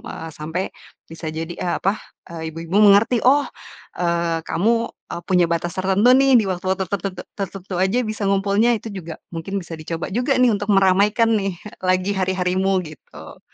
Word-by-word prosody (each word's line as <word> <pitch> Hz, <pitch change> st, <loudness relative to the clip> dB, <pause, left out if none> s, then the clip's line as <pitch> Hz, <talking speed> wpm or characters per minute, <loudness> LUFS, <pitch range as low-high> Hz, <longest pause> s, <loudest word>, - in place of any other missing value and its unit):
eee, 165 Hz, -, -7 dB
sampai 160 Hz, +5 st, -4 dB, 0.5 s
bisa 165 Hz, 0 st, -7 dB
jadi, 160 Hz, +2 st, -5 dB
eee, 175 Hz, -, -2 dB
apa, 195 Hz, -, +2 dB, 0.4 s
eee, 160 Hz, -1 st, -6 dB
ibu-ibu 165 Hz, +3 st, -4 dB
mengerti, 210 Hz, +3 st, +5 dB
"Oh, 280 Hz, +3 st, +4 dB, 0.5 s
eee, 170 Hz, -2 st, -1 dB
kamu, 230 Hz, +5 st, +1 dB
eee, 170 Hz, -, -9 dB
punya 180 Hz, -2 st, +4 dB
batas 170 Hz, +1 st, -1 dB
tertentu 195 Hz, +6 st, +4 dB
nih, 270 Hz, -1 st, +5 dB
di 220 Hz, -, +4 dB
waktu-waktu 185 Hz, +1 st, -1 dB
tertentu 195 Hz, -1 st, -3 dB, 0.2 s
tertentu 195 Hz, -1 st, -5 dB
saja 190 Hz, +6 st, +2 dB
bisa 215 Hz, -1 st, -5 dB
ngumpulnya." 200 Hz, +4 st, +2 dB
Itu 220 Hz, -1 st, -8 dB
juga 170 Hz, -4 st, -7 dB, 0.2 s
mungkin 165 Hz, +4 st, -5 dB
bisa 170 Hz, -, -8 dB
dicoba 165 Hz, +3 st, -5 dB
juga 250 Hz, +5 st, +1 dB
nih, 250 Hz, -1 st, +4 dB
untuk 205 Hz, 0 st, -3 dB
meramaikan 200 Hz, +4 st, +3 dB
nih, 195 Hz, -2 st, -3 dB, 0.2 s
lagi 185 Hz, +1 st, +1 dB
hari-harimu 190 Hz, 0 st, 0 dB
gitu. 80 Hz, -, -12 dB
190 Hz, 165 wpm, -21 LUFS, 170-210 Hz, 0.5 s, mengerti